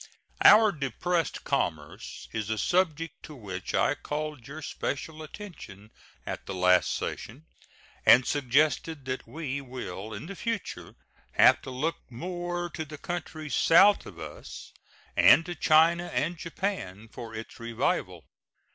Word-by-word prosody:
Our 215 0 +8
depressed 160 - -2
commerce - - -3
is 110 -1 -3
a 110 - -1
subject 165 - 0
to 155 - -10
which 95 -7 -5
I - - +3
called 150 -3 -5
your 150 +3 -8
special 155 +3 -4
attention 155 - -10 0.3
at - - -6
the 95 - -4
last 90 0 +4
session, 135 +9 -5 0.6
and 125 +1 +7
suggested 145 +2 +1
that 130 -2 -4
we 140 +1 -4
will 115 -6 -7
in 110 +4 -7
the 195 +4 -7
future 230 0 -4 0.4
have - - +6
to - - -8
look 140 +6 -2
more 175 +6 -4
to 160 - -4
the 155 0 -9
countries 155 -2 -5
south 195 +5 +5
of - - -11
us, - - -9 0.4
and 165 - +7
to 175 - -4
China 165 +2 +4
and 145 +8 -1
Japan, 165 - -4
for 115 -1 -9
its 110 +1 -8
revival. 115 -1 -2
150 Hz, 140 wpm, -28 LUFS, 120-170 Hz, 0.6 s, Our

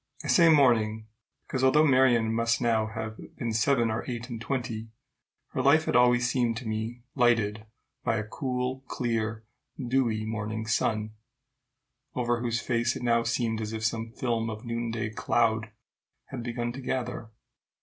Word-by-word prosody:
I - - -5
say 170 -2 +6
morning, 115 -7 +4 0.4
because, 130 -1 -3
although 150 +4 +5
Marion 125 -5 +4
must 115 0 +1
now 115 -3 +2
have 110 0 -5 0.2
been 115 -2 -3
seven 115 +1 +2
or 110 - -2
eight 120 0 -5
and 115 -1 -5
twenty, 120 -3 -3 0.6
her 130 - -2
life 150 +4 +4
had - - 0
always 125 0 +5
seemed 120 -2 +1
to 120 -1 -6
me 110 +2 -4
lighted 110 -4 +2 0.4
by - - +1
a 110 - -1
cool, 125 +2 -3
clear, 110 -2 -2 0.3
dewy 120 -4 0
morning 110 0 -3
sun, 110 -1 0 1.0
over 120 -1 0
whose 120 -1 0
face 120 0 0
it - - -6
now 115 -1 +3
seemed 115 -1 -1
as 110 0 -4
if 110 0 -3
some 115 0 -1
film 115 -2 -1
of 110 +1 -7
noonday 115 -2 -2
cloud 110 -1 +1 0.6
had 130 - -5
begun 120 0 -3
to 135 +3 -8
gather. 125 -3 -3
115 Hz, 160 wpm, -28 LUFS, 110-125 Hz, 1.0 s, say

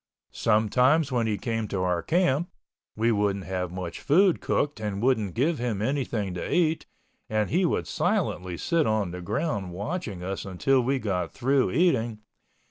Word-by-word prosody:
Sometimes 125 +7 +3
when 120 -3 +1
he 105 -2 0
came 115 -1 -2
to 95 -2 -2
our 90 -2 +1
camp—we 140 - -1
wouldn't 100 -3 0
have 90 0 -3
much 90 -2 -6
food 180 +4 +4
cooked 145 -3 0
and 105 -2 -3
wouldn't 110 -6 +1
give 145 +4 +1
him 120 -4 -1
anything 110 -5 -1
to 90 - -4
eat, 165 -2 +1 0.4
and 110 -1 0
he 180 +3 +3
would - - -1
silently 90 0 -1
sit 170 - +1
on 110 -5 0
the 90 +1 -6
ground 100 - -2
watching 105 - -4
us 95 +1 -4
until 115 +8 +1
we 135 +3 +1
got 95 -8 -2
through 135 +1 +2
eating. 120 -11 +2
110 Hz, 160 wpm, -26 LUFS, 95-140 Hz, 0.4 s, food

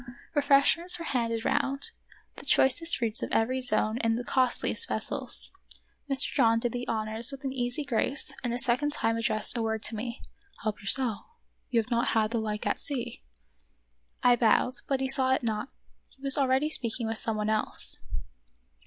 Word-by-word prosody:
Refreshments 290 +5 +3
were 335 - -7
handed 230 -4 -2
round; 275 +1 -1 0.5
the - - -10
choicest 330 +5 +2
fruits 230 -2 -1
of - - -4
every 255 +4 0
zone 220 -2 0
in 230 -1 0
the 245 - -4
costliest 255 - 0
vessels. - - 0 0.6
Mr. 275 0 +6
John 230 -4 +3
did 240 0 -2
the 245 +1 -5
honors 220 +2 +4
with 275 0 -9
an 265 -1 -3
easy 245 +3 -3
grace 270 +1 -1
and 245 - -2
a 240 - -2
second 265 +4 +1
time 225 -5 0
addressed 220 -1 -1
a 235 - -2
word 220 -1 -2
to 225 - -3
me. 235 +3 -6 0.2
" 400 -1 -25
Help 215 -1 -3
yourself; 220 +1 +3 0.5
you 240 -4 +2
have 225 +2 -4
not 235 0 +1
had 215 0 +1
the 230 - -1
like 210 -1 -4
at - - -1
sea." 245 -4 -5 1.0
I 245 0 +5
bowed, 240 +2 +2
but 270 -1 -1
he 265 - 0
saw 260 -1 +3
it - - -5
not; 220 +2 -3 0.4
he 270 - -24
was 275 -1 +8
already 275 +2 +1
speak 235 -5 0
ing 235 - -3
with 225 0 -2
some 225 -2 -1
one 210 0 -1
else. 215 0 -2
245 Hz, 190 wpm, -27 LUFS, 225-270 Hz, 1.0 s, was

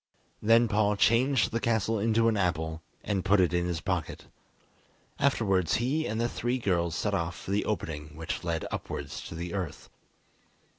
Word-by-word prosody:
Then 115 +2 +5
Paul 105 -1 +2
changed 120 +4 +3
the 115 - 0
castle 110 -1 +1
into 115 +2 +3
an 115 - +3
apple, 80 -4 -1 0.2
and 100 -3 -1
put 100 +1 +4
it 90 -1 +3
in 90 0 +1
his 85 -2 -2
pocket. 90 -5 -3 0.9
Afterwards 100 -10 +2
he 140 +7 0
and 110 - -2
the 120 - +2
three 120 +1 -1
girls 85 -7 0
set 105 +1 -1
off 85 -2 -1
for - - -7
the 100 +1 +1
opening 75 -7 -4
which 80 +1 -4
led 85 -2 -2
upwards - - -5
to - - -8
the 85 +1 -5
earth. 95 -6 -5
100 Hz, 170 wpm, -29 LUFS, 85-115 Hz, 0.9 s, Then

